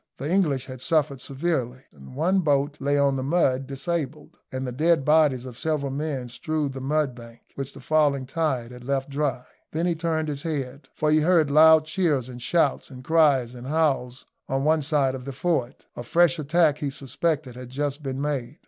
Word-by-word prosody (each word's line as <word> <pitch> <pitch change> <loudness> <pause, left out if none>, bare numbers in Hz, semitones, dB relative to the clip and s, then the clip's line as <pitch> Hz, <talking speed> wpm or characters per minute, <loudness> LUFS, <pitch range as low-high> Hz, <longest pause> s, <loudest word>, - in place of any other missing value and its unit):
The 140 - -4
English 150 -9 +1
had 130 -2 -9
suffered 145 -4 0
severely. 135 -4 -2
One 150 - -1
boat 145 -3 +1
lay 145 +1 +1
on 140 -1 +2
the - - -2
mud, 135 -3 +1
disabled, 150 +2 -4
and 130 0 -3
the 125 - -3
dead 155 +2 +2
bodies 150 -5 +3
of 125 -2 -9
several 150 -4 -1
men 140 -3 -3
strewed 145 +3 -3
the 135 - -6
mudbank, 130 -5 -2
which 135 0 -6
the 140 - -12
falling 145 -2 +2
tide 130 -5 -2
had 125 0 -11
left 135 +1 -2
dry. 135 -3 -1 0.3
Then 165 +2 0
he 175 - +2
turned 160 -1 -1
his 145 -2 -4
head, 140 -3 -4
for 155 0 +1
he 155 - +5
heard 160 -3 +3
loud 155 +1 +7
cheers 155 -7 0
and 125 -1 -9
shouts, 145 +2 +1
and 130 -1 -11
cries 140 -6 +3
and 125 +1 -9
howls, 140 -5 0 0.2
on 135 0 0
one 155 +1 +3
side 140 -2 +1
of 130 -1 -7
the 140 - -5
fort. 140 -3 -2
A - - -6
fresh 170 0 +3
attack, 155 0 +2
he 145 - -2
suspected, 140 0 -2
had 125 0 -9
just 145 +2 -3
been 135 -2 -4
made. 140 -1 -3
140 Hz, 195 wpm, -25 LUFS, 130-155 Hz, 0.3 s, loud